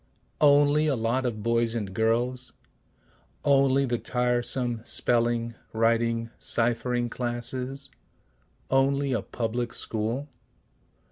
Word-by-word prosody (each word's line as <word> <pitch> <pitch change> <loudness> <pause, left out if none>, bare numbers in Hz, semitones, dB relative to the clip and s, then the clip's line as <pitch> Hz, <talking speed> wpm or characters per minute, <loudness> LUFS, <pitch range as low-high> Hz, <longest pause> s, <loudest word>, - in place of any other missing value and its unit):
Only 145 +1 +5
a 145 - +2
lot 120 +3 0
of 110 -3 -4
boys 115 0 +1
and 100 -5 -4
girls? 120 +4 0 0.9
Only 140 -1 +4
the 120 -2 -1
tiresome 120 -1 0
spelling, 120 -1 0 0.2
writing, 115 0 +1
ciphering 120 +1 +1
classes? 125 +3 -4 0.8
Only 135 +1 +2
a 115 - 0
public 120 +2 -3
school? 115 +6 -3
120 Hz, 95 wpm, -26 LUFS, 115-130 Hz, 0.9 s, Only